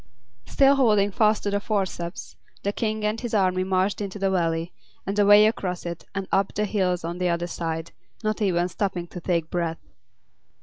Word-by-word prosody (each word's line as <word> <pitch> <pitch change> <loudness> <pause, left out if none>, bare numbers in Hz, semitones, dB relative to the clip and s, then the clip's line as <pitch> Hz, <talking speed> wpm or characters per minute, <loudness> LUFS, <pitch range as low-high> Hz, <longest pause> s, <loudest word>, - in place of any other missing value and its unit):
Still 275 0 +4
holding 210 -6 +3
fast 215 +1 +2
to 205 - -1
the 205 - +1
forceps, 190 -4 -3 0.3
the 200 - 0
King 215 -1 -2
and 215 +2 -1
his 240 -3 -3
army 185 -2 +2
marched 190 +2 0
into 200 0 -4
the 195 -1 0
Valley, 165 -1 0 0.3
and 200 +2 -2
away 205 +1 +7
across 185 -5 -1
it, 170 -1 -6
and 195 -1 -3
up 195 0 +1
the 210 - +1
hills 185 -4 0
on 170 +2 -4
the 180 -1 +1
other 170 0 0
side, 165 -1 -4 0.3
not 215 +1 -1
even 175 -3 +2
stopping 185 -1 -2
to 175 +1 -9
take 170 -2 -1
breath. 170 -2 -1
190 Hz, 185 wpm, -25 LUFS, 175-210 Hz, 0.3 s, away